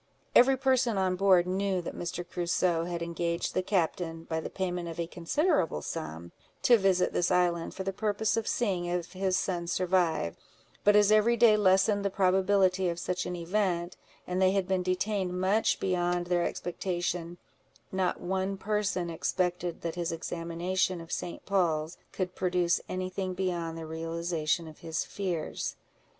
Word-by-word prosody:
Every 265 Hz, +2 st, +7 dB
person 260 Hz, -4 st, +2 dB
on 185 Hz, -1 st, +1 dB
board 185 Hz, -2 st, +4 dB
knew 190 Hz, +1 st, 0 dB
that -, -, -5 dB
Mr. 175 Hz, 0 st, -4 dB
Crusoe 175 Hz, -1 st, 0 dB
had 170 Hz, -1 st, -3 dB
engaged 170 Hz, 0 st, -2 dB
the -, -, +1 dB
captain, 170 Hz, -3 st, -1 dB
by 160 Hz, -1 st, -2 dB
the -, -, -5 dB
payment 180 Hz, -2 st, -3 dB
of 165 Hz, -, -7 dB
a 170 Hz, -, 0 dB
considerable 175 Hz, -, 0 dB
sum, 80 Hz, +2 st, -6 dB, 0.3 s
to 240 Hz, -2 st, +6 dB
visit 190 Hz, -2 st, +2 dB
this 175 Hz, -, +1 dB
island, 175 Hz, -2 st, +1 dB
for 190 Hz, -, -4 dB
the 195 Hz, 0 st, -2 dB
purpose 210 Hz, +1 st, 0 dB
of 225 Hz, -1 st, -2 dB
seeing 190 Hz, -7 st, 0 dB
if 175 Hz, 0 st, -3 dB
his 185 Hz, 0 st, 0 dB
son 175 Hz, -2 st, -2 dB
survived; 175 Hz, -, +1 dB, 0.4 s
but 205 Hz, 0 st, +5 dB
as 210 Hz, 0 st, +5 dB
every 215 Hz, +2 st, +4 dB
day 230 Hz, -2 st, +6 dB
lessened 200 Hz, 0 st, +3 dB
the 200 Hz, -, +1 dB
probability 190 Hz, -1 st, +3 dB
of 170 Hz, -, -3 dB
such 180 Hz, +1 st, -2 dB
an 180 Hz, -, -3 dB
event, 175 Hz, 0 st, -1 dB, 0.3 s
and 180 Hz, +1 st, -2 dB
they 190 Hz, 0 st, +4 dB
had 195 Hz, -2 st, 0 dB
been 190 Hz, -1 st, +1 dB
detained 185 Hz, 0 st, -1 dB
much 195 Hz, +4 st, +2 dB
beyond 175 Hz, -1 st, 0 dB
their 175 Hz, -1 st, +1 dB
expectation, 175 Hz, -1 st, -3 dB, 0.5 s
not 190 Hz, -1 st, 0 dB
one 190 Hz, +1 st, -2 dB
person 200 Hz, -3 st, -1 dB
expected 180 Hz, +1 st, -1 dB
that 165 Hz, -1 st, -3 dB
his 170 Hz, -1 st, -2 dB
examination 170 Hz, +2 st, -2 dB
of 165 Hz, 0 st, -10 dB
St. 175 Hz, -, -4 dB
Paul's 170 Hz, -5 st, 0 dB
could 185 Hz, -1 st, -3 dB
produce 180 Hz, -2 st, +1 dB
any 185 Hz, 0 st, -3 dB
thing 185 Hz, -1 st, -3 dB
beyond 175 Hz, -3 st, -2 dB
the 165 Hz, -, -6 dB
realization 165 Hz, 0 st, -2 dB
of 155 Hz, -, -12 dB
his 160 Hz, -1 st, -3 dB
fears. 180 Hz, -6 st, -3 dB
180 Hz, 165 wpm, -29 LUFS, 170-190 Hz, 0.5 s, Every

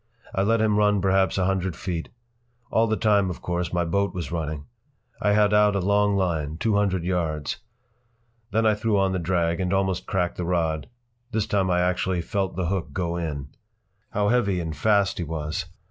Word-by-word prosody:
I 95 Hz, -, +1 dB
let 110 Hz, +3 st, +2 dB
him 105 Hz, -1 st, +2 dB
run 105 Hz, -1 st, +3 dB
perhaps 95 Hz, 0 st, +2 dB
a 95 Hz, -, +2 dB
hundred 95 Hz, -2 st, 0 dB
feet. 85 Hz, -3 st, -4 dB, 0.6 s
All 115 Hz, +1 st, +3 dB
the 110 Hz, 0 st, 0 dB
time, 100 Hz, -3 st, +3 dB
of 90 Hz, -, -7 dB
course, 90 Hz, 0 st, -2 dB
my 85 Hz, 0 st, 0 dB
boat 100 Hz, +4 st, 0 dB
was 85 Hz, -4 st, -4 dB
running. 80 Hz, -3 st, -3 dB, 0.6 s
I 105 Hz, -, +3 dB
had 105 Hz, 0 st, +4 dB
out 105 Hz, -1 st, +4 dB
a -, -, +2 dB
long 100 Hz, +2 st, +2 dB
line—two 85 Hz, +1 st, 0 dB
hundred 100 Hz, -4 st, +1 dB
yards. 80 Hz, -5 st, -1 dB, 0.9 s
Then 110 Hz, +1 st, +1 dB
I 110 Hz, -, +5 dB
threw 105 Hz, 0 st, 0 dB
on 95 Hz, -1 st, +2 dB
the 95 Hz, -, -1 dB
drag 85 Hz, -1 st, 0 dB
and 90 Hz, -1 st, -1 dB
almost 95 Hz, -2 st, 0 dB
cracked 90 Hz, -2 st, -1 dB
the 90 Hz, -, -2 dB
rod. 80 Hz, -3 st, -1 dB, 0.4 s
This 110 Hz, -2 st, 0 dB
time 100 Hz, -3 st, +1 dB
I 90 Hz, 0 st, +2 dB
actually 90 Hz, 0 st, 0 dB
felt 95 Hz, -1 st, -2 dB
the 95 Hz, 0 st, -1 dB
hook 85 Hz, -5 st, -2 dB
go 85 Hz, 0 st, -1 dB
in. 75 Hz, -5 st, -4 dB, 0.6 s
How 105 Hz, -1 st, +1 dB
heavy 100 Hz, -7 st, +2 dB
and 80 Hz, -2 st, -4 dB
fast 100 Hz, +4 st, +2 dB
he -, -, -1 dB
was! 75 Hz, -1 st, -3 dB
95 Hz, 190 wpm, -25 LUFS, 85-100 Hz, 0.9 s, I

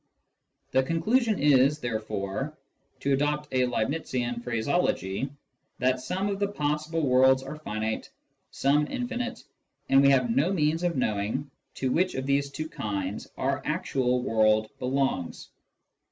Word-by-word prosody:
The 130 Hz, -, +4 dB
conclusion 210 Hz, -, +1 dB
is, 140 Hz, 0 st, +4 dB
therefore, 110 Hz, +3 st, -3 dB, 0.4 s
to 140 Hz, -, +1 dB
adopt 145 Hz, +1 st, 0 dB
a 130 Hz, -1 st, +3 dB
Leibnizian 120 Hz, -1 st, -2 dB
phraseology, 120 Hz, -, 0 dB, 0.5 s
that 130 Hz, 0 st, +1 dB
some 185 Hz, +10 st, -2 dB
of 200 Hz, -1 st, -2 dB
the 200 Hz, -, +1 dB
possible 155 Hz, -3 st, -1 dB
worlds 130 Hz, +1 st, +5 dB
are 150 Hz, +3 st, -7 dB
finite, 110 Hz, -5 st, -3 dB, 0.4 s
some 145 Hz, +2 st, +2 dB
infinite, 250 Hz, -1 st, -4 dB, 0.5 s
and 135 Hz, 0 st, +6 dB
we 140 Hz, -, +6 dB
have 125 Hz, -4 st, +3 dB
no 150 Hz, +8 st, +3 dB
means 160 Hz, -2 st, +1 dB
of 175 Hz, -4 st, 0 dB
knowing 110 Hz, +4 st, -1 dB, 0.2 s
to 130 Hz, -1 st, -1 dB
which 185 Hz, +5 st, +1 dB
of 130 Hz, 0 st, -3 dB
these 140 Hz, 0 st, +1 dB
two 155 Hz, +3 st, -5 dB
kinds 100 Hz, -7 st, -4 dB
our 135 Hz, +1 st, 0 dB
actual 130 Hz, -6 st, 0 dB
world 110 Hz, -2 st, +2 dB
belongs. 130 Hz, -8 st, -1 dB
135 Hz, 135 wpm, -27 LUFS, 120-155 Hz, 0.5 s, and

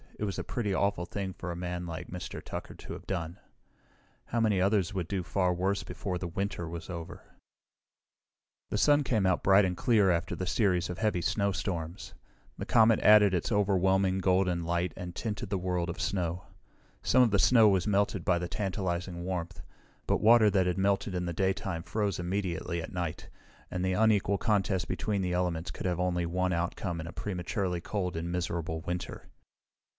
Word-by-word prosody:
It -, -, -4 dB
was 100 Hz, -3 st, -2 dB
a -, -, -3 dB
pretty 110 Hz, -5 st, -2 dB
awful 100 Hz, -2 st, 0 dB
thing 95 Hz, 0 st, -4 dB
for 90 Hz, 0 st, -6 dB
a -, -, -4 dB
man 90 Hz, 0 st, -4 dB
like 85 Hz, +1 st, -6 dB
Mr. 90 Hz, 0 st, -7 dB
Tucker -, -, -7 dB
to -, -, -9 dB
have -, -, -10 dB
done. 85 Hz, -2 st, -3 dB, 0.9 s
How 115 Hz, -, -2 dB
many 105 Hz, -4 st, +2 dB
others 100 Hz, 0 st, +2 dB
would 90 Hz, -4 st, -2 dB
do 95 Hz, -1 st, -2 dB
far 90 Hz, +1 st, +1 dB
worse 95 Hz, +3 st, 0 dB
before 90 Hz, -3 st, -4 dB
the 90 Hz, -, -4 dB
winter 95 Hz, 0 st, -3 dB
was 85 Hz, +1 st, -7 dB
over? 85 Hz, 0 st, -7 dB, 1.5 s
The -, -, -1 dB
sun 145 Hz, +5 st, +4 dB
came 110 Hz, -7 st, +1 dB
out 95 Hz, -1 st, +1 dB
bright 95 Hz, +1 st, +6 dB
and 90 Hz, -1 st, -1 dB
clear 105 Hz, -6 st, +4 dB
after 85 Hz, -1 st, -1 dB
the 95 Hz, -, -3 dB
series 90 Hz, -3 st, +1 dB
of 90 Hz, -, -7 dB
heavy 105 Hz, -5 st, +1 dB
snowstorms. 90 Hz, -3 st, -2 dB, 0.4 s
The -, -, -5 dB
comet 115 Hz, -1 st, +5 dB
added 105 Hz, -2 st, +6 dB
its 90 Hz, +3 st, -1 dB
overwhelming, 95 Hz, -2 st, +2 dB
golden 90 Hz, -2 st, +2 dB
light 85 Hz, +1 st, -1 dB
and 90 Hz, -2 st, -7 dB
tinted 110 Hz, -1 st, -4 dB
the 100 Hz, -, 0 dB
world 90 Hz, -1 st, -1 dB
of 90 Hz, +4 st, -5 dB
snow. 90 Hz, -2 st, -2 dB, 0.6 s
Some 130 Hz, -, +4 dB
of 115 Hz, -, +2 dB
the 100 Hz, -, +3 dB
snow 115 Hz, -1 st, +6 dB
was 95 Hz, -3 st, +2 dB
melted 100 Hz, -3 st, +1 dB
by 90 Hz, +1 st, +2 dB
the 90 Hz, 0 st, -3 dB
tantalizing 90 Hz, -3 st, -3 dB
warmth, 90 Hz, -2 st, -4 dB, 0.4 s
but -, -, +1 dB
water 110 Hz, -1 st, +6 dB
that 95 Hz, -2 st, +2 dB
had 90 Hz, -, 0 dB
melted 95 Hz, 0 st, +1 dB
in 90 Hz, 0 st, -1 dB
the 85 Hz, -, -3 dB
daytime 95 Hz, -1 st, -1 dB
froze 100 Hz, +1 st, -2 dB
immediately 85 Hz, -2 st, -2 dB
at 100 Hz, -, -8 dB
night, 90 Hz, -1 st, -4 dB, 0.4 s
and 90 Hz, 0 st, -2 dB
the 95 Hz, 0 st, +1 dB
unequal 105 Hz, -1 st, +3 dB
contest 100 Hz, -3 st, +1 dB
between 105 Hz, -3 st, -1 dB
the 90 Hz, -1 st, -1 dB
elements 90 Hz, -2 st, -1 dB
could -, -, -4 dB
have 90 Hz, -1 st, -1 dB
only 90 Hz, -1 st, 0 dB
one 90 Hz, +1 st, 0 dB
outcome 85 Hz, +1 st, -2 dB
in 80 Hz, -, -7 dB
a -, -, -6 dB
prematurely 90 Hz, -2 st, -3 dB
cold 90 Hz, -2 st, -3 dB
and 85 Hz, +1 st, -3 dB
miserable 85 Hz, -2 st, -2 dB
winter. 90 Hz, +1 st, -5 dB
90 Hz, 190 wpm, -30 LUFS, 85-100 Hz, 1.5 s, bright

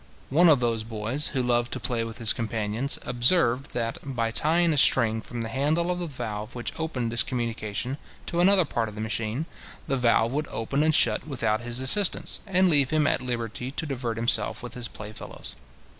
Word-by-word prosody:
One 170 Hz, +5 st, +5 dB
of 145 Hz, -4 st, +5 dB
those 115 Hz, -2 st, -1 dB
boys, 115 Hz, +6 st, -2 dB
who 130 Hz, -4 st, -1 dB
loved 120 Hz, -1 st, +1 dB
to -, -, -3 dB
play 120 Hz, -3 st, -1 dB
with 115 Hz, 0 st, -7 dB
his 115 Hz, -2 st, +3 dB
companions, 115 Hz, +3 st, 0 dB
observed 125 Hz, +1 st, +3 dB
that, 115 Hz, -1 st, -2 dB
by 120 Hz, -5 st, -2 dB
tying 165 Hz, +6 st, +2 dB
a -, -, -2 dB
string 115 Hz, -5 st, +4 dB
from 120 Hz, +1 st, -7 dB
the 115 Hz, -, -3 dB
handle 155 Hz, +8 st, 0 dB
of 180 Hz, -, -3 dB
the 175 Hz, -, -3 dB
valve 115 Hz, -5 st, -6 dB
which 120 Hz, -, -4 dB
opened 130 Hz, -8 st, -3 dB
this 120 Hz, 0 st, +3 dB
communication 115 Hz, +2 st, -3 dB, 0.3 s
to 170 Hz, -, -3 dB
another 185 Hz, 0 st, +5 dB
part 115 Hz, -5 st, -2 dB
of 105 Hz, -, -12 dB
the -, -, -8 dB
machine, 110 Hz, +5 st, -2 dB, 0.4 s
the 135 Hz, -, -1 dB
valve 115 Hz, -1 st, +2 dB
would 150 Hz, +1 st, -2 dB
open 135 Hz, +6 st, -2 dB
and 155 Hz, 0 st, +3 dB
shut -, -, +2 dB
without 115 Hz, -6 st, -1 dB
his 120 Hz, +1 st, -1 dB
assistance, 180 Hz, +10 st, +2 dB
and 190 Hz, -1 st, +3 dB
leave 145 Hz, -6 st, +5 dB
him 155 Hz, -1 st, +1 dB
at -, -, +2 dB
liberty 120 Hz, 0 st, -4 dB
to 145 Hz, +4 st, -4 dB
divert 125 Hz, -5 st, -4 dB
himself 115 Hz, +1 st, +1 dB
with 120 Hz, -, -7 dB
his 120 Hz, -1 st, -4 dB
play 105 Hz, 0 st, -9 dB
fellows. -, -, -8 dB
120 Hz, 205 wpm, -26 LUFS, 115-145 Hz, 0.4 s, One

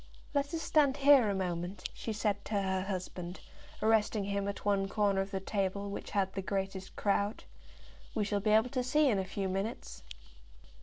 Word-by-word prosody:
"Let 285 Hz, 0 st, 0 dB
us 325 Hz, -1 st, -3 dB
stand 290 Hz, -3 st, +3 dB
here 275 Hz, -5 st, +6 dB
a 200 Hz, -, 0 dB
moment," 180 Hz, 0 st, -3 dB
she 225 Hz, -, -5 dB
said 205 Hz, -2 st, -1 dB
to 210 Hz, -2 st, 0 dB
her 190 Hz, -1 st, 0 dB
husband, 185 Hz, -2 st, -5 dB, 0.4 s
arresting 220 Hz, -1 st, +3 dB
him 200 Hz, 0 st, -1 dB
at 200 Hz, -, -5 dB
one 200 Hz, -1 st, +2 dB
corner 200 Hz, -1 st, +2 dB
of 195 Hz, -, -4 dB
the 195 Hz, -1 st, -2 dB
table 200 Hz, 0 st, -2 dB
which -, -, -6 dB
had 195 Hz, -1 st, 0 dB
the 195 Hz, -, -2 dB
greatest 195 Hz, 0 st, -3 dB
crowd. 205 Hz, +1 st, 0 dB, 0.7 s
"We 215 Hz, -, +1 dB
shall 205 Hz, 0 st, 0 dB
be 215 Hz, +2 st, 0 dB
able 220 Hz, +3 st, +4 dB
to 255 Hz, -2 st, 0 dB
see 295 Hz, +4 st, +3 dB
in 205 Hz, -5 st, +2 dB
a 190 Hz, -, -1 dB
few 195 Hz, +1 st, -3 dB
minutes." 195 Hz, +5 st, -4 dB
200 Hz, 190 wpm, -32 LUFS, 195-220 Hz, 0.7 s, here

